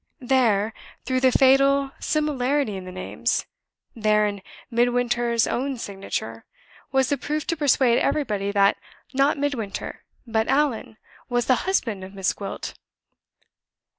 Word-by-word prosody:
There 230 -5 +2 0.3
through 255 0 +1
the 260 0 +4
fatal 275 +1 +4
similarity 285 -5 0
in 190 -1 -7
the 185 - -7
names 185 0 -2 0.5
there, 215 -1 +3
in 205 -1 -3 0.3
Midwinter's 240 -1 +2
own 270 +1 -2
signature, 195 - -5 0.5
was 265 -1 +2
the 285 - 0
proof 300 +3 -2
to 335 - -1
persuade 265 -5 +3
everybody 205 -9 0
that, 200 -1 +3 0.4
not 275 +3 +3
Midwinter, 275 -8 -3 0.2
but 220 -1 0
Allan, 270 -6 0 0.3
was 245 -1 +1
the 255 +8 +1
husband 225 - 0
of 190 +1 -10
Miss 195 -1 0
Gwilt! 195 -1 -6
245 Hz, 130 wpm, -24 LUFS, 210-275 Hz, 0.5 s, the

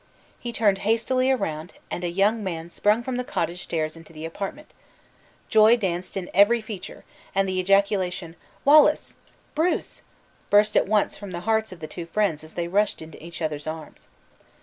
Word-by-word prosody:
He 240 - -5
turned 205 -4 +2
hastily 230 +5 +2
round, 165 -9 -2 0.2
and 175 - -3
a 175 - 0
young 205 +5 +2
man 170 -3 -4
sprung 210 +6 +2
from 255 0 -3
the 250 - -1
cottage 175 -6 -2
stairs 155 -2 -2
into 165 -1 -14
the 155 0 -8
apartment 200 - -6 0.8
joy 220 +2 +6
danced 185 -3 -3
in 185 -2 -5
every 205 +5 +5
feature, 215 -4 -8 0.3
and 195 0 +2
the 185 0 -1
ejaculation, 185 -3 +1 0.3
"Wallace!" 295 +2 +5 0.4
"Bruce!" 330 +4 -1 0.5
burst 210 +1 +4
at - - +4
once 210 0 +1
from 200 -1 -8
the 175 -1 -5
hearts 220 +1 +1
of 180 -3 -11
the 155 - -5
two 170 +2 -7
friends 170 -5 0
as 155 - -13
they 170 -1 -2
rushed 205 +4 +1
into 160 -1 -12
each 170 0 -7
other's 150 -1 -3
arms. 160 0 -7
195 Hz, 175 wpm, -25 LUFS, 170-220 Hz, 0.8 s, joy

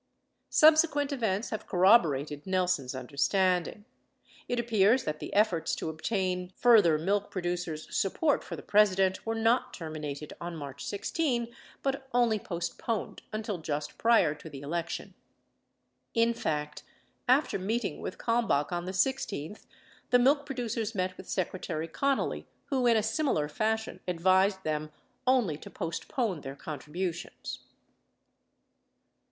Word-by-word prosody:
715 315 +1 +7
Subsequent 290 -1 -1
events 220 -4 -1
have 220 - -4
corroborated 160 - +3
Nelson's 180 -8 0
understanding; 180 - 0 0.6
it 245 - -1
appears 230 +1 +3
that 155 0 -3
the - - -6
efforts 200 -5 +2
to 160 - -3
obtain 180 +1 -2
further 210 -10 +6
milk 200 +5 0
producers' 175 -4 -3
support 285 - +1
for - - -6
the - - -10
President 195 -2 +3
were 225 - 0
not 225 +2 +2
terminated 150 -3 -6
on 170 0 -5
March 140 -3 -7
16 235 +1 -1 0.3
but 270 0 -2
only 235 -3 +3
postponed 190 +5 -3
until 215 -3 -3
just 150 -2 -4
prior 225 -10 +4
to 155 +1 -11
the 140 -2 -9
election. 170 +4 -4 1.0
In 230 0 +4
fact, 150 -8 -3 0.5
after 255 -4 +3
meeting 200 -2 -2
with - - -5
Kalmbach 230 -12 +1
on 175 0 -2
the 185 - -4
16th, 210 - -1 0.4
the 245 - +6
milk 280 +4 +3
producers 235 -4 -3
met 185 -1 -1
with - - -12
Secretary 170 -3 -2
Connally 275 - -1 0.3
who 260 -3 +2
in 230 -1 +5
a 215 - +1
similar 220 - +1
fashion 220 +8 -1
advised 190 +2 +3
them 155 0 -2 0.4
only 240 - +3
to - - -11
postpone 180 - -3
their 135 0 -7
contributions. 160 +5 -5
190 Hz, 130 wpm, -29 LUFS, 160-230 Hz, 1.0 s, 715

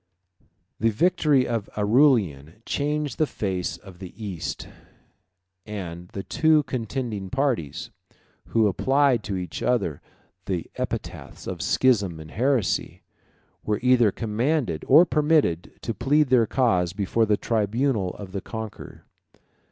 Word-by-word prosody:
1291 115 - +2
The 110 -2 -1
victory 155 -6 +3
of 115 -3 -2
Aurelian 105 - +2
changed 150 -2 -2
the 155 - +3
face 95 -7 -3
of 95 -3 -14
the 95 -2 -9
East, 100 -7 -5 1.0
and 90 -5 -7
the 100 +2 -6
two 155 +4 +3
contending 115 -6 -4
parties, 90 - -1 0.6
who 115 -1 +2
applied 130 +4 +2
to 100 - -2
each 90 -3 -5
other 100 - 0 0.4
the 90 -4 -2
epithets - - -5
of 90 -3 -5
schism 100 -6 +2
and 80 0 -10
heresy, 125 -1 0 0.6
were 105 -1 0
either 125 -4 +5
commanded 115 - -1
or 155 +6 +8
permitted 150 - +1
to 115 - -2
plead 140 +5 +2
their 120 -3 +4
cause 90 -10 +1
before 110 +3 0
the 105 -1 +3
tribunal 110 -2 0
of 100 -3 -9
the 100 0 -4
conqueror. 110 0 -8
110 Hz, 130 wpm, -25 LUFS, 95-130 Hz, 1.0 s, or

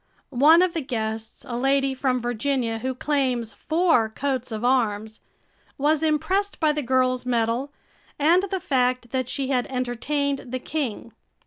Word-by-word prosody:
One 310 +7 +6
of 365 -2 0
the 330 - -2
guests, 220 -4 -4
a 240 - -4
lady 270 +2 +2
from 260 -1 0
Virginia 240 -1 -1
who 260 +2 -3
claims 255 -5 -1
four 320 -9 +2
coats 255 +1 -3
of 220 +2 -3
arms, 220 -4 0 0.6
was 300 +2 +2
impressed 320 +6 0
by 310 -2 +3
the 300 0 -2
girl's 255 -1 +1
medal 240 +2 0 0.5
and 330 +5 +4
the 380 - -1
fact 250 -5 0
that 255 -2 -1
she 270 -2 -2
had 250 -3 +1
entertained 270 +3 -2
the 255 +1 -3
king. 255 -5 -4
260 Hz, 150 wpm, -24 LUFS, 240-290 Hz, 0.6 s, One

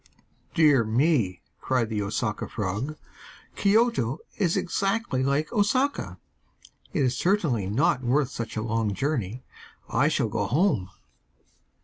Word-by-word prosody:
'Dear 150 -6 +5
me!' 110 - +1 0.2
cried 125 -3 0
the 105 -2 -1
Osaka 105 +2 -2
frog, 105 +9 -3 0.6
'Kioto 205 - +2 0.2
is 180 -5 +1
exactly 195 - 0
like 140 - 0
Osaka. 255 +7 +1 0.7
It 155 -7 0
is 125 -1 +1
certainly 155 - +1
not 125 +4 +2
worth 135 +2 +1
such 115 -3 -5
a 110 - -1
long 115 -2 -1
journey. 125 -2 -2 0.4
I - - +2
shall - - +1
go - - -1
home! 140 - +1
130 Hz, 120 wpm, -26 LUFS, 110-170 Hz, 0.7 s, Dear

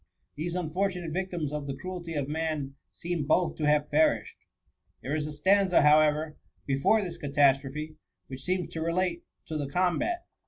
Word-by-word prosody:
These 170 +4 -3
unfortunate 180 0 -2
victims 175 -5 -3
of 150 -1 -4
the 135 - -3
cruelty 180 -3 -6
of 140 -2 -1
man 155 -3 -2 0.2
seem 170 -4 -3
both 175 +3 +2
to 150 - 0
have 150 0 +2
perished. 155 +2 +2 0.7
There 135 - -3
is 155 -1 -1
a - - -5
stanza, 190 +3 +3
however, 150 +1 +4 0.3
before 140 +11 +2
this 175 -2 -6
catastrophe, 145 +1 +1 0.3
which 130 0 -8
seems 180 +3 -2
to 160 - -4
relate 170 +1 0 0.2
to 160 - -4
the 145 - -2
combat. 185 - 0
155 Hz, 160 wpm, -28 LUFS, 150-180 Hz, 0.7 s, however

